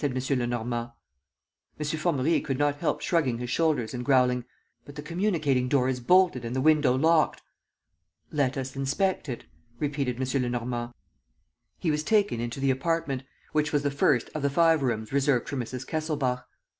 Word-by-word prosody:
Lenormand. 120 -3 -1 0.9
M. 150 - -2
Formerie 155 0 +1
could 135 -3 -2
not 145 0 +1
help - - -1
shrugging 145 -9 +1
his 120 0 -5
shoulders 155 -9 +1
and 125 -1 -4
growling: 125 -2 +3 0.4
"But 145 - -12
the 145 - -7
communicating 155 -7 0
door 130 -1 +2
is 130 -1 -1
bolted 180 -1 +3
and 120 +2 -4
the - - 0
window 150 -3 +4
locked." 160 +3 +2 0.9
"Let 140 -3 0
us 130 0 -4
inspect 145 +5 -1
it," 120 - -5 0.3
repeated 140 -2 -1
M. 130 +1 0
Lenormand. 120 -1 -2 0.9
He 165 - 0
was 150 0 0
taken 205 - +2
into 120 +2 -4
the 135 0 +2
apartment, 135 -1 -1 0.3
which 150 0 +1
was 145 -1 +1
the 145 - 0
first 140 -3 +2
of 155 - -3
the 140 - +2
five 165 +1 +4
rooms 115 -3 -2
reserved 140 -3 +2
for 145 - -4
Mrs. 125 0 -4
Kesselbach. 150 -6 -2
135 Hz, 165 wpm, -27 LUFS, 125-150 Hz, 0.9 s, window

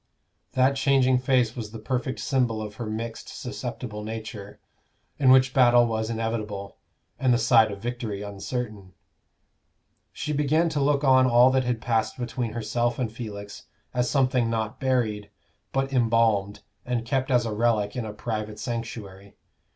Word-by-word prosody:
That 130 +2 +3
changing 135 -2 +3
face 125 -3 +2
was 115 -4 -5
the 115 - -8
perfect 130 +4 -2
symbol 125 -5 0
of 105 -1 -7
her 115 - -4
mixed 115 +1 -5
susceptible 105 -4 -6
nature, 110 -2 -7 0.6
in 135 - +4
which 130 0 +6
battle 120 -2 +6
was 110 -1 -2
inevitable, 110 -3 -4 0.4
and 130 -2 +3
the 120 - +4
side 115 -2 +4
of 100 0 -8
victory 115 -4 -4
uncertain. 100 -1 -5 1.2
She 150 0 -4
began 150 +4 +2
to 150 -3 -1
look 140 +1 +2
on 130 -1 +5
all 125 +1 +6
that 130 -1 +1
had 120 -2 -1
passed 115 0 0
between 120 -2 -3
herself 120 +1 -1
and 120 -4 -2
Felix 105 -3 -8 0.3
as 125 0 0
something 130 -4 +2
not 110 +2 -2
buried, 115 -6 0 0.4
but 135 0 -1
embalmed 115 -4 +2 0.2
and 120 -2 -2
kept 130 +2 -1
as 125 -2 +3
a 110 - -2
relic 105 -2 +1
in 125 - -2
a 110 - -5
private 110 0 -4
sanctuary. 105 -5 -6
120 Hz, 155 wpm, -26 LUFS, 110-130 Hz, 1.2 s, which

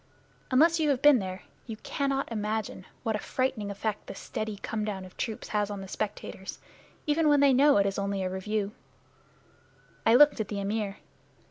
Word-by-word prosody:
Unless 325 +6 +4
you 310 -2 +2
have 270 -2 +1
been 290 -4 +7
there 185 -1 -5 0.2
you 225 -2 -6
cannot 275 0 -2
imagine 215 -3 -3 0.2
what 225 -3 0
a - - -2
frightening 250 -5 -1
effect 210 +1 -3
this - - -7
steady 215 -1 -4
come 220 -1 -2
down 195 -3 -4
of 185 - -14
troops 220 -3 -4
has 210 -1 0
on 200 -1 -5
the 195 - -8
spectators, 190 -1 -5 0.5
even 305 +1 +2
when 290 -1 +5
they 280 -1 +6
know 280 +1 +5
it 200 - +4
is 195 0 -1
only 200 -1 -1
a - - 0
review. 200 +2 -2 1.3
I 225 - +5
looked 290 0 +7
at 215 - -1
the 205 -1 -4
Amir. 200 0 -2
215 Hz, 190 wpm, -28 LUFS, 200-270 Hz, 1.3 s, been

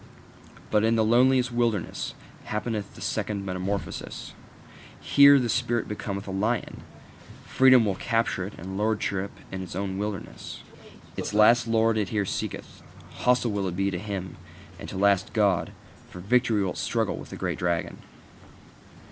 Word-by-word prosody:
But 105 -1 +3
in 115 +1 +3
the 110 -1 +3
loneliest 125 +2 +4
wilderness 120 -6 -1 0.3
happeneth 105 -1 -3
the - - -12
second 100 -2 -2
metamorphosis: 95 +1 -4 0.7
here 140 0 +7
the 125 -3 +1
spirit 120 0 0
becometh 100 -1 -5
a - - -4
lion; 105 +5 -2 0.6
freedom 130 -3 +5
will 100 - +1
it 95 - -11
capture, 115 -5 0
and 95 +3 -6
lordship 100 -2 -1 0.2
in 95 - -4
its 90 -2 -7
own 95 0 -3
wilderness. 105 -2 -6 0.5
Its 105 - -4
last 115 +3 +5
Lord 115 -1 +2
it 105 - -1
here 105 -3 0
seeketh: - - -5 0.4
hostile 125 -2 +2
will 100 -2 -1
it 90 - -4
be 95 +1 0
to 90 - -3
him, 95 -3 -5 0.4
and - - -8
to - - -7
its 95 - -2
last 100 -2 +3
God; 100 -5 +2 0.4
for 90 - -10
victory 110 +1 +2
will 95 - -1
it - - -8
struggle - - -1
with - - -9
the - - -7
great - - -3
dragon. 85 -2 -1
105 Hz, 160 wpm, -26 LUFS, 95-115 Hz, 0.7 s, here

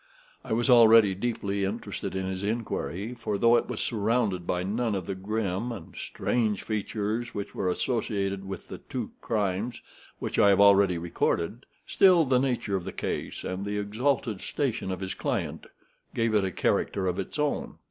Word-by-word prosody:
I - - -8
was 115 +3 +1
already 115 -5 +7
deeply 100 -1 -2
interested 100 -1 -4
in 95 0 -1
his 95 0 -3
inquiry, 105 - -2
for, 110 -4 -3
though 115 +3 +5
it - - +1
was - - -3
surrounded 105 -4 0
by 90 0 0
none 110 +3 -1
of 95 -3 -3
the 95 - -3
grim 100 +3 -2
and 100 -8 -9
strange 110 -5 -1
features 110 +2 -2
which 100 - -4
were 95 - -1
associated 100 0 -1
with 95 -1 -7
the - - -8
two - - -5
crimes 105 +2 -1 0.4
which - - -3
I 100 - +7
have 100 - +4
already 100 -3 +6
recorded, 85 +6 -1 0.2
still, 180 -4 +5
the 130 -2 +3
nature 125 -6 0
of 95 - -2
the - - -5
case - - -4
and 95 +1 -3
the 105 0 -2
exalted 110 +1 -1
station 120 -9 -2
of 95 0 -4
his 95 -1 -3
client - - -3 0.5
gave 115 -1 +1
it 105 -2 +3
a 95 - 0
character 95 +2 0
of 90 +1 -1
its 95 - -5
own. 150 -1 -1
105 Hz, 180 wpm, -28 LUFS, 95-115 Hz, 0.5 s, already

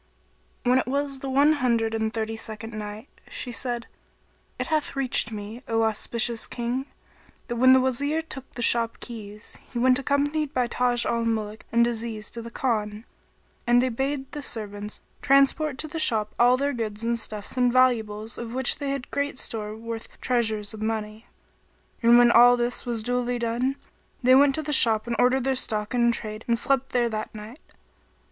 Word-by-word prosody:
When 250 +1 +4
it - - -3
was 275 0 -2
the 270 - -5
One 285 +3 +4
Hundred 235 -5 0
and 220 0 -1
Thirty 225 -1 -3
second 220 0 -5
Night, 210 +3 -7 0.2
She 250 - -5
said, 240 -1 -2 0.7
It - - -2
hath 310 -3 -1
reached 255 -4 +2
me, 215 +3 -7
O 225 -1 +1
auspicious 230 +1 +1
King, 245 +3 -3 0.6
that 240 - -4
when 255 +2 +6
the 260 - +6
Wazir 285 +5 0
took 270 -4 -8
the 240 - -2
shop 230 -1 +2
keys, 210 -3 -9
he 245 - -5
went 255 +2 +4
accompanied 290 +2 0
by 250 -1 +2
Taj 245 0 0
al 235 0 0
Muluk 220 -2 -3
and 235 0 +4
Aziz 225 -2 -4
to 235 - -7
the 230 - -8
Khan, 220 -3 -2 0.6
and 240 0 +5
they 255 +1 +2
bade 270 +3 -3
the 295 - -6
servants 210 -4 -5 0.2
transport 275 +1 +3
to 310 - -3
the 320 +1 -5
shop 215 -8 +1
all 245 +1 +5
their 285 +1 -1
goods 220 -3 -4
and 235 0 0
stuffs 210 -1 -4
and 250 -1 +3
valuables 225 -3 +1
of 235 0 -6
which 260 -1 +3
they 285 -1 -3
had 275 -2 -4
great 285 -2 -2
store 215 -3 -4
worth 230 0 -7
treasures 220 -4 -1
of 215 - -9
money. 220 0 -4 0.7
And 235 0 +6
when 240 0 +6
all 245 +1 +7
this 240 +1 -2
was 230 -2 -2
duly 245 +1 -1
done, 240 +3 -1 0.5
they 255 +1 +6
went 275 +1 +5
to 315 - -3
the 300 +1 -2
shop 225 -5 +5
and 235 -1 -2
ordered 255 +1 +3
their 270 +1 +1
stock 215 -3 -1
in 235 -1 +3
trade 215 -1 -6
and 235 -1 +2
slept 270 +2 +1
there 240 -1 +2
that 215 0 -5
night. 215 +6 -10
240 Hz, 185 wpm, -25 LUFS, 220-260 Hz, 0.7 s, all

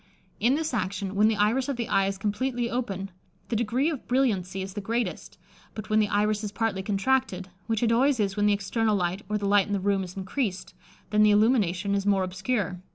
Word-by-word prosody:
In 240 +6 +3
this 315 -2 -2
action, 200 -3 -2
when 210 +2 +4
the 220 - +2
iris 230 +7 +1
of 280 - -1
the 235 -1 -3
eye 195 -5 +2
is 195 0 -3
completely 235 +4 -2
open, 195 -6 -3 0.4
the 235 - -1
degree 235 +5 +1
of 290 - -7
brilliancy 195 -8 0
is 190 0 -7
the 205 - -4
greatest; 230 +4 -3 0.4
but 215 -1 -7
when 215 - +4
the 210 - +3
iris 210 +1 +1
is 210 - -3
partly 215 -3 -1
contracted, 195 -1 0 0.2
which 225 0 0
it 230 - +3
always 260 +2 +3
is 195 -2 0
when 205 0 +2
the 205 - +4
external 210 +2 0
light, 180 +1 -1
or 210 - 0
the 205 - -3
light 200 -1 +4
in 205 - -3
the 200 - +1
room, 195 0 +1
is 185 +1 -9
increased, 190 -1 -3 0.4
then 210 0 +3
the 215 - +6
illumination 205 -3 +2
is 200 0 -1
more 195 -2 +3
obscure. 190 0 -2
210 Hz, 220 wpm, -26 LUFS, 195-235 Hz, 0.4 s, the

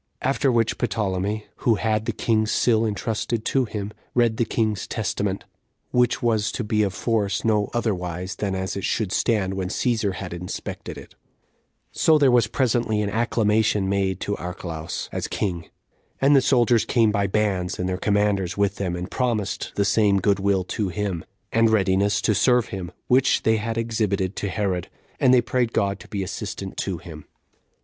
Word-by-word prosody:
After 135 +1 +2
which 115 -2 +1
Ptolemy, 105 -2 -1
who 115 - +2
had 110 0 0
the - - 0
king's 110 -1 +1
seal 115 -2 +3
intrusted 110 +2 -2
to 135 -2 +2
him, 105 -2 -5 0.2
read 120 -2 +3
the 120 - +2
king's 110 -4 -1
testament, 100 -3 -2 0.5
which 125 0 +2
was 110 -3 +1
to 125 - -2
be 105 0 +1
of 100 -2 +1
force 105 -3 0
no 105 -2 +2
otherwise 90 -5 -2
than 100 -2 -2
as 95 0 -3
it 100 - -4
should 105 -5 -1
stand 100 -4 +1
when 95 -1 -2
Cæsar 110 -3 0
had 90 -3 -6
inspected 90 +1 -6
it; - - -12 0.8
so 160 -1 +4
there 140 -3 +4
was 120 -1 +4
presently 120 -4 +1
an 100 - -2
acclamation 110 -3 +1
made 95 -1 0
to 100 - -1
Archelaus, 85 -3 -5
as - - -3
king; 85 -5 -3 0.5
and 140 +2 +5
the 135 - +6
soldiers 120 -4 +3
came 115 -3 +3
by 100 -1 +1
bands, 95 -3 0
and 90 - -2
their 90 0 -1
commanders 100 -2 +1
with 100 -1 +1
them, 90 -3 -2
and 90 +2 -6
promised 115 -6 -1
the 100 - +2
same 100 -1 +3
good 100 0 +2
will 95 -1 +1
to 100 +2 -2
him, 95 -3 -3 0.3
and 115 0 +4
readiness 100 -1 +2
to 110 - +3
serve 125 +2 +3
him, 95 -2 -5
which 130 +1 +3
they 110 0 +3
had 115 +1 -3
exhibited 105 -4 -1
to 100 - -3
Herod; 95 -3 -2 0.3
and 130 - +5
they 125 -1 +6
prayed 120 -1 0
God 100 0 0
to - - -13
be 100 -3 -3
assistant 95 0 -5
to 95 -3 -2
him. 80 -2 -11
105 Hz, 180 wpm, -24 LUFS, 95-115 Hz, 0.8 s, the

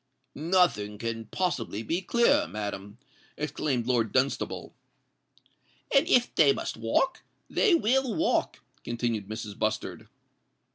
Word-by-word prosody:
"Nothing 155 - +1
can 115 0 -4
possibly 115 - -2
be 165 - -1
clearer, 235 - +3
madam," 100 +2 -6 0.4
exclaimed 145 -4 -1
Lord 115 -4 +1
Dunstable. 135 +1 -1 1.2
"And 275 - +5
if 245 -1 +3
they 145 -3 +5
must - - -4
walk, 115 - 0 0.3
they 410 -7 +3
will 265 -3 +1
walk," 325 +1 0 0.2
continued 115 -4 -2
Mrs. 110 -1 -6
Bustard. 110 0 -2
120 Hz, 110 wpm, -28 LUFS, 110-185 Hz, 1.2 s, And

